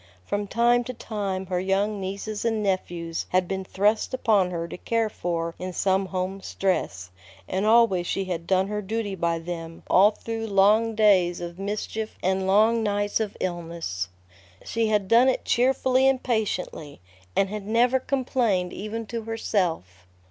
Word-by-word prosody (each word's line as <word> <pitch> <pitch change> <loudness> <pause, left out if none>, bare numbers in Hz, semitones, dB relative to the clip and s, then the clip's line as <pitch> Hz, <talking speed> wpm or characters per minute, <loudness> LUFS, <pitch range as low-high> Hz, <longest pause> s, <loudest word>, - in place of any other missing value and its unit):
From 205 0 -2
time 240 +3 +3
to 255 - -6
time 200 -4 -3
her 180 -1 -1
young 200 +3 0
nieces 200 +2 -4
and 225 -2 0
nephews 175 -4 -2
had 185 0 +2
been 190 +1 -3
thrust 210 +6 +1
upon 210 -7 +2
her 170 -1 -3
to - - -7
care 225 +3 0
for 170 -3 -3
in 185 0 -5
some 190 +1 +1
home 185 +1 -3
stress, 95 - -2 0.4
and 190 +3 -1
always 220 -6 +4
she 195 - -1
had 170 -2 -4
done 190 0 +3
her 210 +1 -3
duty 210 0 -3
by 170 -2 0
them 165 0 -7
all 200 +3 +7
through 225 +1 -5
long 215 +3 +3
days 190 -5 +4
of 175 +1 -7
mischief 215 +2 -4
and 190 +1 +1
long 220 +4 +4
nights 205 -1 0
of 215 -2 -3
illness. 170 - -4 0.6
She 230 -1 0
had 210 -3 +1
done 235 +5 +6
it 260 - -1
cheerfully 260 +1 +3
and 265 -1 +2
patiently, 195 - -2 0.4
and 195 - +2
had 210 -1 -6
never 240 +4 +3
complained 240 -9 0
even 220 +3 -5
to 230 +2 -4
herself. 165 - -2
200 Hz, 160 wpm, -25 LUFS, 180-225 Hz, 0.6 s, all